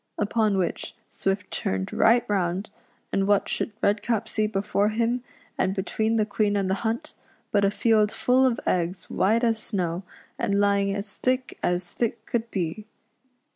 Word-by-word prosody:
Upon 210 -1 +1
which 180 -2 -2
Swift 195 -1 -2
turned 95 0 -2
right 240 +1 +4
round, 190 0 -1 0.4
and 195 0 +1
what 205 -1 +3
should - - -2
Redcap 220 +2 +1
see 215 -1 0
before 205 0 +1
him, 235 +3 0 0.4
and 190 +1 +1
between 220 +3 0
the 215 -2 +2
Queen 205 0 0
and 195 -2 +1
the 190 - +1
hunt, 235 +7 -2 0.4
but 205 -2 +3
a 200 - +5
field 215 0 +3
full 255 +1 +3
of 255 -3 +2
eggs 180 +1 -1
white 220 +5 +2
as 225 -2 +2
snow, 180 -6 -1 0.4
and 200 0 +1
lying 200 -1 +2
as 200 0 -6
thick 255 0 -1
as 175 0 -1
thick 235 0 -2
could 230 -1 -2
be. 190 +2 -3
205 Hz, 165 wpm, -25 LUFS, 195-225 Hz, 0.4 s, a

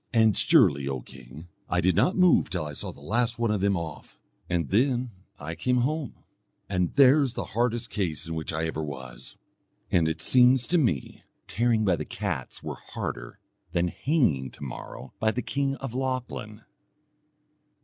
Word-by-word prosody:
And 110 -4 +4
surely, 90 - +4
O 65 -2 -3
king, 65 +6 -13 0.2
I 90 - +1
did 90 0 +2
not 185 - +3
move 180 -2 +4
till 85 -5 -2
I 75 - -5
saw 75 - -2
the - - -16
last 115 +9 0
one 115 -2 +1
of 105 -3 0
them 100 -1 +2
off. 85 -1 -8 0.3
And 85 -5 0
then 125 +3 +1 0.3
I 80 +3 -5
came 125 +10 +1
home. 150 0 -2 0.5
And 90 -3 -1
there's 140 -2 +5
the - - -2
hardest 120 0 0
case 85 -5 -2
in 85 - -4
which 80 -1 -3
I 80 0 -1
ever 80 -1 -3
was; 65 -4 -8 0.5
and 85 -2 +3
it 80 0 -2
seems 125 +5 +5
to 175 - +3
me 90 - -1
that - - -34
tearing 115 -1 +2
by 90 -4 +2
the 75 - -4
cats 95 -10 -4
were - - -5
harder - - -6 0.4
than 85 0 +1
hanging 95 - +1
to - - -12
morrow 65 -3 -8
by 110 - +2
the 125 +3 -2
king 140 -1 -1
of 135 -4 -7
Lochlann." 125 -4 -4
105 Hz, 180 wpm, -27 LUFS, 80-125 Hz, 0.5 s, there's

